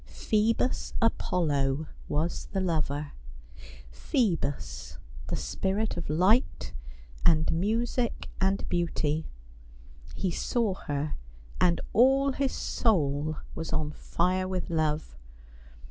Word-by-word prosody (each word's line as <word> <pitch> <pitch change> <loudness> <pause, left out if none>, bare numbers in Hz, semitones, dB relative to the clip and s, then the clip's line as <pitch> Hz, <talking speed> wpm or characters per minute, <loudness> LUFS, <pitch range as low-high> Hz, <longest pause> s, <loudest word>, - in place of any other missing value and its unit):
Phoebus 225 +4 0
Apollo 155 - +1 0.2
was 160 +4 -1
the 195 - +1
lover. 150 -5 -1 0.8
Phoebus, 185 - -1 0.3
the - - -2
spirit 200 +3 -1
of 170 -3 -4
light, 185 - +2 0.5
and 160 -2 +4
music, 230 +7 0
and 195 +1 +1
beauty. 160 -3 0 0.9
He 185 - 0
saw 225 +3 0
her, 145 -4 -3 0.4
and 175 -1 +4
all 270 +4 +5
his 270 0 0
soul 155 - +1 0.2
was 160 0 -5
on 155 -2 0
fire 185 +4 0
with 185 -2 -3
love. 155 - 0
175 Hz, 100 wpm, -29 LUFS, 155-215 Hz, 0.9 s, all